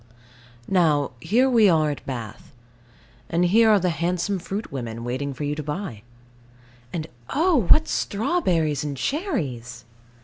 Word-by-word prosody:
Now, 155 -7 +2
here 240 - +2
we 230 -6 +5
are 155 -3 +3
at 145 - -7
Bath; 120 -6 -7 0.8
and 170 +2 +2
here 220 +5 +5
are 210 -2 +5
the 180 -1 +1
handsome 180 +4 -1
fruit 200 +5 -5
women, 115 -4 -5
waiting 130 +4 -3
for 135 +2 -6
you 145 0 -1
to 150 - -4
buy. 150 - -5 0.9
And 160 -3 -3 0.2
oh, 305 - +2
what 315 +1 +6
strawberries 185 - 0
and 145 -2 -4
cherries! 130 - -3
165 Hz, 140 wpm, -24 LUFS, 140-210 Hz, 0.9 s, what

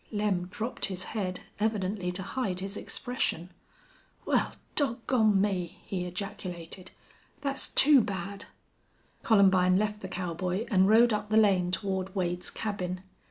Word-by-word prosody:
Lem 205 -4 0
dropped 225 +6 -2
his 185 -1 -4
head, 185 -4 -3 0.2
evidently 200 -3 -1
to 190 +1 -4
hide 195 -4 -2
his 195 +2 -4
expression. 185 -10 -2 0.7
"Wal, - - +1 0.2
dog 235 -5 +2
gone 220 -6 +3
me!" 190 -2 -1
he 180 -2 -3
ejaculated. 180 -1 -6 0.5
"Thet's 275 -1 -1
too 285 -2 +6
bad." 195 -1 -5 0.8
Columbine 190 -4 +4
left 210 +1 -1
the 190 - -5
cowboy 180 +3 -3
and 190 -1 +4
rode 230 +1 +6
up 210 0 -2
the 215 - +3
lane 190 -5 +4
toward 190 0 -2
Wade's 180 -1 -1
cabin. 185 -4 -4
195 Hz, 135 wpm, -29 LUFS, 180-215 Hz, 0.8 s, too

